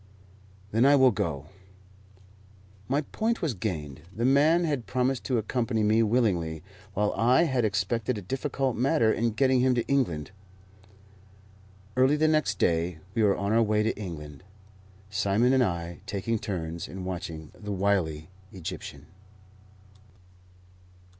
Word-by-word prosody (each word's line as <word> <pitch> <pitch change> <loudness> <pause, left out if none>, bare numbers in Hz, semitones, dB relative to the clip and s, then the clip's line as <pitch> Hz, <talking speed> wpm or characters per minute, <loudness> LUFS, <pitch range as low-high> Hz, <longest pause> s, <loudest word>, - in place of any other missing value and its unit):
"Then 115 +3 +3
I 140 +2 +6
will 130 -2 +6
go." 75 -8 -3 1.4
My 140 +3 +1
point 220 +9 -2
was 155 -6 0
gained. 80 -9 -4
The 115 +4 -2
man 150 +6 +4
had 145 -7 -2
promised 130 0 0
to 125 - +1
accompany 115 0 -1
me 110 +2 +3
willingly, 95 -9 +1 0.3
while 105 +1 +1
I 125 +7 +4
had 130 -7 +1
expected 110 +3 0
a - - -5
difficult 135 +3 -2
matter 115 -2 +2
in 115 +1 0
getting 130 +2 +3
him 130 0 +3
to 120 - 0
England. 90 - 0 1.6
Early 130 +3 +4
the 155 +1 +2
next 155 -9 +1
day 85 0 +1 0.2
we 115 - 0
were 100 -2 +3
on 100 +1 -1
our 115 - +4
way 105 -1 +2
to 110 - 0
England, 75 -7 -8 0.7
Simon 105 +6 +2
and 130 - +4
I 85 -4 -3
taking 110 +2 -2
turns 85 -5 -4
in 95 +1 -7
watching 85 -4 -6
the 105 -1 -7
wily 90 -5 0 0.2
Egyptian. 75 -5 -7
110 Hz, 140 wpm, -27 LUFS, 90-130 Hz, 1.6 s, I